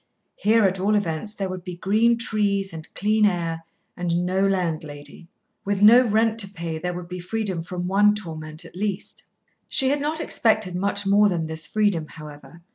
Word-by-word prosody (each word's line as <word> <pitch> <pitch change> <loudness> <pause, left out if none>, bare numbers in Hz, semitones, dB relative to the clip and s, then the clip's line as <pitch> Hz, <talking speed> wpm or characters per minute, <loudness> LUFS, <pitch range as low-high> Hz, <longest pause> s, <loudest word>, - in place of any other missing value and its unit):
Here, 220 +1 +3
at 190 0 +1
all 205 +3 +2
events, 205 +2 -1
there 195 -2 -3
would 185 -1 -6
be 180 0 -7
green 220 +6 +2
trees 205 -5 -1
and 160 -1 -9
clear 210 +1 +3
air, 165 -3 -3 0.3
and 175 0 -1
no 190 +2 +1
landlady. 160 -5 -4 0.4
With 200 0 -1
no 235 +4 +8
rent 225 0 +1
to 200 - +6
pay, 170 -4 -5
there 180 +1 -3
would 175 -1 -7
be 180 +1 -6
freedom 190 -1 -3
from 180 +1 -5
one 205 +2 +4
torment 160 -4 -6
at 165 - -14
least. 200 0 -3 0.5
She 265 -3 +4
had 285 +1 0
not 310 +2 -1
expected 215 - +1
much 200 +2 -2
more 205 +1 +4
than 170 -3 -1
this 160 0 -5
freedom, 205 -5 0
however. 150 +2 -12
190 Hz, 185 wpm, -23 LUFS, 170-210 Hz, 0.5 s, no